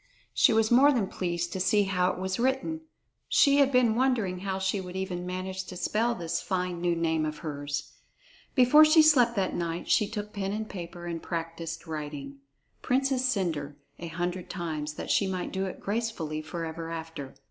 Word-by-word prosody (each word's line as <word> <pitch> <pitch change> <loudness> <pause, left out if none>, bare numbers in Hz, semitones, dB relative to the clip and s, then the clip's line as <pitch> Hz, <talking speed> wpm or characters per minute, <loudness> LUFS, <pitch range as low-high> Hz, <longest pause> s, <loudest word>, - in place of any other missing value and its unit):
She - - +5
was 220 0 +2
more 270 +4 +7
than 240 -7 +1
pleased 175 -2 -3
to 190 - -3
see 195 +3 +3
how 180 -2 +1
it - - -7
was 190 +2 -3
written; 265 +6 0 0.5
she 280 -1 +5
had 280 -1 +4
been 250 -3 +4
wondering 230 -7 +1
how 190 0 -2
she 190 +1 -1
would 180 0 -8
even 180 -2 -3
manage 185 +1 -4
to 180 - -8
spell 225 +6 0
this 165 -2 -2
fine 180 -2 -2
new 175 -1 +1
name 160 -1 0
of 155 0 -3
hers. 145 -1 -4 0.6
Before 260 +4 +7
she 310 +1 +7
slept 250 -6 +5
that 190 -3 0
night, 170 0 -3
she 210 - +4
took 210 -1 -5
pen 195 -1 -2
and 215 +1 -3
paper 175 -2 -8
and 170 -1 -4
practiced 165 -1 -5
writing 145 -3 -6 0.4
"Princess 265 0 +1
Cendre" 170 - -1 0.2
a 170 - -5
hundred 175 +2 -3
times, 155 -4 -4
that - - -4
she 200 - +3
might 185 -1 -3
do 190 0 -1
it - - -7
gracefully 200 -8 -2
forever 165 +1 -5
after. 160 -4 -7
185 Hz, 185 wpm, -28 LUFS, 165-220 Hz, 0.6 s, more